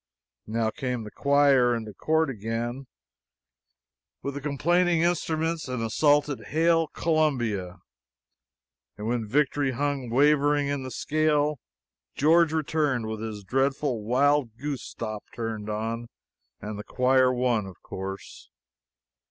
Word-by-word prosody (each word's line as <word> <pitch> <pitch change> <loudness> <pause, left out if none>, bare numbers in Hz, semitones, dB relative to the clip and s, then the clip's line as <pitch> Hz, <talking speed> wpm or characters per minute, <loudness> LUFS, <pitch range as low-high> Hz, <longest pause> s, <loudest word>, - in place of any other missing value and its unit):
Now 110 0 0
came 125 -2 -3
the 105 - -9
choir 140 -4 +4
into 110 -2 -6
court 160 +6 +1
again, 120 +4 -4 1.4
with 140 - -3
the 140 - -6
complaining 170 +4 +2
instruments, 165 -2 0
and 125 -3 -3
assaulted 145 +4 +2
"Hail 165 +1 +2
Columbia"; 120 - 0 1.2
and 105 - -6
when 115 -1 -1
victory 140 +2 +1
hung 140 -1 -2
wavering 145 +2 +3
in 140 -1 -1
the 130 - -6
scale, 150 0 +1 0.6
George 165 +2 +4
returned 150 -6 0
with 110 0 -4
his 110 -2 -6
dreadful 135 +2 0
wild 130 +1 +2
goose 140 0 -4
stop 110 -2 -6
turned 110 -2 -4
on 115 +2 -3 0.5
and 105 0 -6
the - - -5
choir 130 +1 +3
won, 120 -5 0
of 95 - -12
course. 95 +1 -7
130 Hz, 120 wpm, -26 LUFS, 115-150 Hz, 1.4 s, choir